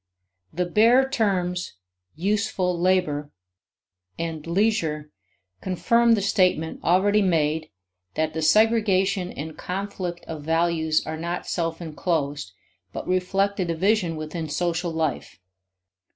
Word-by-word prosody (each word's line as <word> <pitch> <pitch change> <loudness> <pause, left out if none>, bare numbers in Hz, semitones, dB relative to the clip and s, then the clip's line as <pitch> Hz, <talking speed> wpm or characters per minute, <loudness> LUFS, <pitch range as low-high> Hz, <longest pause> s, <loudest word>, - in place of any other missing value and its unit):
The 180 +2 -1
bare 230 +8 +4
terms 185 - -1 0.4
"useful 190 0 0
labor" 170 -5 +1 0.9
and 165 -2 -4
"leisure" 170 -6 0 0.5
confirm 230 +6 +3
the 205 - -2
statement 180 -5 +1
already 200 +4 +3
made 160 -4 +1 0.5
that 155 0 0
the 160 - -3
segregation 195 -1 +3
and 155 +2 -7
conflict 180 -2 -5
of 160 -2 -6
values 160 0 +1
are 160 0 -4
not 170 +2 -4
self 165 -1 -2
inclosed, 150 - -2 0.4
but - - -6
reflect 195 +2 0
a 185 - +1
division 175 +1 +1
within 155 +1 -5
social 170 +3 -1
life. 160 -1 -3
175 Hz, 110 wpm, -24 LUFS, 160-195 Hz, 0.9 s, bare